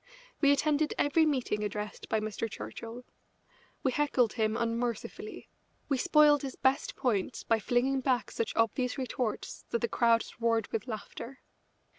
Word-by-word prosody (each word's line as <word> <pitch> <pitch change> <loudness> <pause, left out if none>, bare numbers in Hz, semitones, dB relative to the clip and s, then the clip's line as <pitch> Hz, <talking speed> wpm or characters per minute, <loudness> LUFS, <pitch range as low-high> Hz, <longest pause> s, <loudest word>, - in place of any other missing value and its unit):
We 285 -2 +6
attended 300 +1 +2
every 315 +2 +3
meeting 250 -7 0
addressed 210 0 -5
by 220 - +2
Mr. 215 +1 -3
Churchill. 230 +3 -7 0.8
We 260 - +2
heckled 260 -4 +2
him 220 -1 0
unmercifully; 235 - -3 0.4
we 275 - +2
spoiled 295 0 +5
his 270 -2 -5
best 265 +1 +1
points 225 -2 -1
by 225 -1 +2
flinging 250 +5 +1
back 255 -3 0
such 230 - -2
obvious 250 +4 +1
retorts 250 -3 -3
that - - +1
the 235 - +1
crowds 230 0 +1
roared 230 -2 +2
with 225 +2 -2
laughter. 230 +3 -7
245 Hz, 145 wpm, -30 LUFS, 225-275 Hz, 0.8 s, We